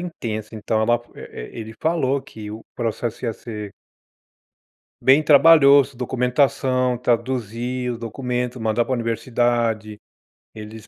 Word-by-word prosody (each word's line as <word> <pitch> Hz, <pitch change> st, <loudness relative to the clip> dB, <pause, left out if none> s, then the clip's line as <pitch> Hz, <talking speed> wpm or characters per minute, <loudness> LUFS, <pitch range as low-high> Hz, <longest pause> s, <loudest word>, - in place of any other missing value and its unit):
intensa, 115 Hz, -11 st, -5 dB
então, 110 Hz, 0 st, -1 dB
ela 120 Hz, +1 st, +2 dB
e -, -, -9 dB
e -, -, -4 dB
ele 110 Hz, 0 st, -8 dB
falou 145 Hz, -4 st, +1 dB
que 110 Hz, -5 st, -10 dB
o 110 Hz, +2 st, -9 dB
processo 120 Hz, 0 st, -3 dB
ia 115 Hz, -, 0 dB
ser 105 Hz, -3 st, -8 dB, 1.3 s
bem 135 Hz, +4 st, +5 dB
trabalhoso, 140 Hz, -3 st, +6 dB
documentação, 125 Hz, 0 st, +1 dB
traduziu, 125 Hz, 0 st, -2 dB
o 115 Hz, -, -9 dB
documento, 125 Hz, +1 st, -3 dB
mandar 110 Hz, +1 st, +1 dB
pra 130 Hz, -, -4 dB
universidade. 115 Hz, -2 st, -1 dB, 0.6 s
Eles 110 Hz, 0 st, -10 dB
120 Hz, 120 wpm, -22 LUFS, 110-130 Hz, 1.3 s, trabalhoso